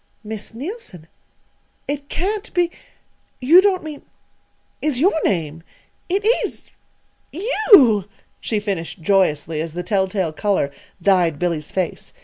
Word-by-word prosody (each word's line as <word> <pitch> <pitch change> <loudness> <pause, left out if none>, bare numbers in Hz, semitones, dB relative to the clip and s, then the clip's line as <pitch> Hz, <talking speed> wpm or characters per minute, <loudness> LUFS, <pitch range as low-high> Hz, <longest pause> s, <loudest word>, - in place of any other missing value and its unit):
"Miss 215 0 -6
Neilson 270 - -7 0.8
it 285 0 -4
can't 400 +4 -3
be 350 -1 +2 0.7
you 315 +9 +7
don't 380 -3 +1
mean 305 -2 -7 0.8
is 295 -5 0
your 365 +8 +4
name 165 -4 -1 0.5
it 395 +3 0 0.2
is - - -6 0.6
you!" 345 - +5 0.3
she 215 - -2
finished 190 -4 -4
joyously, 160 -5 +1
as 160 -1 -5
the 175 +1 -4
telltale 190 -3 0
color 195 -6 0 0.3
dyed 180 -6 +2
Billy's 165 -2 -2
face. 185 -3 -4
205 Hz, 120 wpm, -20 LUFS, -, 0.8 s, you